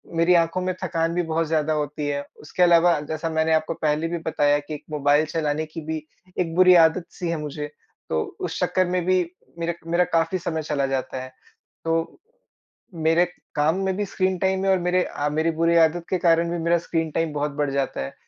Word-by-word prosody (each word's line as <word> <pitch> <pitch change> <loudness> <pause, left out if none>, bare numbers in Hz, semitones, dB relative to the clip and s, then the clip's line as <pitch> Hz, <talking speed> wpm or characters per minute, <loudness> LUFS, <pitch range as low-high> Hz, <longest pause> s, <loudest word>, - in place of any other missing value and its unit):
मेरी 170 +2 +4
आँखों 170 +2 +2
में 185 0 -1
थकान 165 -1 0
भी 175 - +1
बहुत 160 0 0
ज़्यादा 155 -1 +1
होती 150 0 -2
है। 140 0 -1 0.2
उसके 180 +4 0
अलावा 170 -2 +5
जैसा 160 +1 -2
मैंने 160 0 +1
आपको 155 +1 +1
पहले 155 +1 0
भी 170 0 -3
बताया 145 -2 +2
कि 145 +1 -8
एक 150 - -7
मोबाइल 145 +1 +3
चलाने 155 0 -1
की 160 +1 -8
भी 155 -1 -4 0.3
एक 165 -2 -1
बुरी 185 0 +7
आदत 165 +2 0
सी 175 -3 -2
है 170 - -1
मुझे। 150 0 -5 0.4
तो 80 0 +1 0.2
उस - - -4
चक्कर 185 - +1
में 180 -1 0
भी 185 0 +3 0.4
मेरा 170 0 -1 0.2
मेरा 175 +1 +4
काफ़ी 165 +3 +2
समय 160 -2 -3
चला 145 -2 -1
जाता 130 -1 -3
है 130 0 -9 0.5
तो। 165 0 -1 0.8
मेरे 165 +1 +3 0.3
काम 155 +4 +2
में 190 -1 0
भी 205 - -1
स्क्रीन 185 -1 -1
टाइम 190 +1 0
है 195 - +3
और 190 - +4
मेरे 180 +1 +1
अ, 145 - -3
मेरी 160 +2 +1
बुरी 170 0 +3
आदत 165 +1 +3
के 185 - +1
कारण 170 -1 +3
भी 175 - -2
मेरा 170 +1 +2
स्क्रीन 165 -1 -1
टाइम 165 -1 -1
बहुत 145 0 -1
बढ़ 145 -2 +1
जाता 140 -1 -2
है। 65 - -6
165 Hz, 215 wpm, -23 LUFS, 150-175 Hz, 0.8 s, बुरी